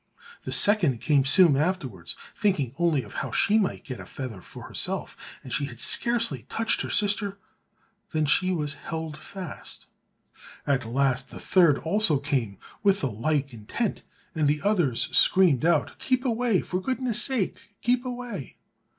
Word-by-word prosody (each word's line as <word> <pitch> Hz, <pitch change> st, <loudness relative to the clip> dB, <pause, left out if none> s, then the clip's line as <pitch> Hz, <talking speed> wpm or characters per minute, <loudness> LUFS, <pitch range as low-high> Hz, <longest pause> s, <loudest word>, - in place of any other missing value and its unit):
The -, -, -6 dB
second 175 Hz, -, +4 dB
came 140 Hz, +2 st, +2 dB
soon 165 Hz, +1 st, +6 dB
afterwards, 135 Hz, -, -2 dB, 0.2 s
thinking 175 Hz, -, 0 dB
only 165 Hz, -6 st, +2 dB
of 105 Hz, -, -13 dB
how -, -, -4 dB
she 215 Hz, +2 st, +2 dB
might 195 Hz, -, -2 dB
get 130 Hz, -3 st, -7 dB
a -, -, -9 dB
feather 125 Hz, -8 st, -7 dB
for -, -, -11 dB
herself, -, -, -3 dB, 0.3 s
but 130 Hz, -, -7 dB
she 145 Hz, -, 0 dB
had 120 Hz, -4 st, -9 dB
scarcely 235 Hz, -, +2 dB
touched 225 Hz, 0 st, +2 dB
her -, -, -4 dB
sister 205 Hz, -1 st, +2 dB, 0.7 s
than 155 Hz, -2 st, 0 dB
she 185 Hz, +5 st, +2 dB
was 150 Hz, -4 st, -1 dB
held 160 Hz, -2 st, -6 dB
fast. 175 Hz, +2 st, -8 dB, 0.8 s
At 135 Hz, -5 st, 0 dB
last 130 Hz, 0 st, 0 dB
the -, -, -9 dB
third 170 Hz, -6 st, +4 dB
also 180 Hz, -3 st, +2 dB
came 130 Hz, -8 st, -2 dB, 0.2 s
with 200 Hz, 0 st, +3 dB
the 135 Hz, -, -1 dB
like 140 Hz, +5 st, -1 dB
intent, 115 Hz, -, -3 dB, 0.3 s
and 155 Hz, -4 st, +1 dB
the 150 Hz, +1 st, 0 dB
others 175 Hz, -, +1 dB
screamed 170 Hz, -8 st, +4 dB
out, 170 Hz, -, +1 dB
"Keep 255 Hz, 0 st, 0 dB
away; 235 Hz, -4 st, +1 dB
for 180 Hz, +1 st, -3 dB
goodness' 250 Hz, 0 st, -1 dB
sake 255 Hz, -8 st, 0 dB, 0.3 s
keep 245 Hz, +1 st, +2 dB
away!" 245 Hz, -, -7 dB
160 Hz, 160 wpm, -26 LUFS, 135-205 Hz, 0.8 s, soon